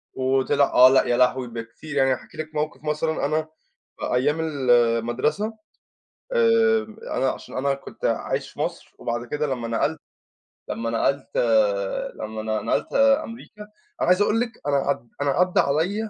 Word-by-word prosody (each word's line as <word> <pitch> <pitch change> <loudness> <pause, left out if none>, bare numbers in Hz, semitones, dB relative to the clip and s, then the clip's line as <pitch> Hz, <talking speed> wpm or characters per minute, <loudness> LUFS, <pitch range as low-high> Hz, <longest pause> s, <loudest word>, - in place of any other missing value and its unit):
وطِلِع، 135 +2 +2
آه، 125 +1 +8
لأ 130 0 +5
يا 120 - +1
لهوي! 125 0 +2
بكتير، 115 +6 -8
يعني 135 -1 +4
هاحكي - - -9
لِك 155 0 -6
موقف 150 0 -3
مثلًا 155 +1 -1
أنا 155 +2 0 0.5
في - - -3
أيام 145 +5 +1
المدرسة، 130 - +1 0.8
آآ 460 -1 +4 0.3
أنا - - +2
عشان - - -9
أنا 140 +1 +1
كنت 135 - -8
عايش - - -1
في - - -18
مصر - - -4
وبعد 120 0 -3
كده 150 +4 -2
لمّا 125 -4 -3
نقلت 115 0 -1 0.7
لمّا 115 0 -3
نقلت 135 +4 0
آآ، - - +1
لمّا 110 0 -6
أنا 110 0 -2
ن - - -10
نقلت 110 - -1 0.3
أمريكا، 230 -4 -11 0.4
أنا - - +1
عايز 185 +3 +4
أقول 210 +2 +2
لِك 240 0 -1 0.2
أنا 145 - +2
عد 135 -4 -1
أنا 145 - +1
عدّى 180 +4 +2
عليَِّ 180 +10 0
145 Hz, 165 wpm, -24 LUFS, 125-185 Hz, 0.8 s, آه